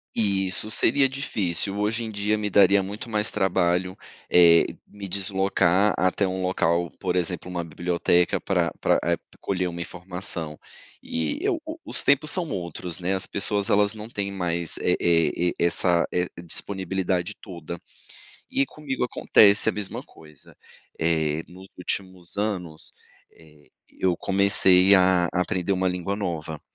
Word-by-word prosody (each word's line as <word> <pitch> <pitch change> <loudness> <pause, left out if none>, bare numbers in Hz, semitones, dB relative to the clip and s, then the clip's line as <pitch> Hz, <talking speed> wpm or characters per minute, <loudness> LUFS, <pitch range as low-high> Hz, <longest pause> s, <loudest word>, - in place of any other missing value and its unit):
Isso, 100 -1 0
seria 135 +5 +3
difícil. 100 -8 -3
Hoje 110 +3 -1
em 110 - -5
dia 105 +1 0
me 105 -1 -2
daria 100 0 +5
muito 100 +5 -7
mais 105 -1 0
trabalho, 90 -2 0 0.3
eh, 85 -1 +6 0.2
me 100 -1 -9
deslocar 95 0 +1
até 95 +2 +1
um 95 0 -3
local, 85 -2 0
por 90 -1 -2
exemplo, 90 0 -2
uma 90 -1 -3
biblioteca 85 +1 0
pra 85 -4 0
pra - - +3
eh, - - +1 0.2
colher 90 -2 -2
uma 85 0 -6
informação. 85 -2 -5 0.4
E 80 - -3
eu 370 -6 0
o 320 +1 -7
os 300 - +5
tempos 140 +2 +4
são 175 -4 +1
outros, 90 -3 -4
né. 90 +2 -1
As 95 0 -2
pessoas 100 0 -1
elas 105 +1 +3
não 110 +1 -9
têm 100 -3 -4
mais 85 -3 -2
é - - +1
é 85 +1 +2
é - - -4
essa 85 0 +2
é 90 0 0 0.2
disponibilidade 95 +1 -2
toda. 85 -3 -8 0.7
E 135 - +1
comigo 135 -2 -5
acontece 105 -4 +4
a 110 - +3
mesma 105 -2 -4
coisa, 75 -3 -18 0.4
eh, 80 -1 0
nos 95 +2 -13
últimos 95 0 -5
anos, 90 -7 -4 0.4
eh, 75 -2 -20 0.2
eu 90 -2 -1
comecei 95 -1 +5
a 90 -2 +3
aprender 90 +1 0
uma 95 0 0
língua 90 +2 -3
nova. 80 -6 -4
95 Hz, 150 wpm, -24 LUFS, 85-100 Hz, 0.7 s, eh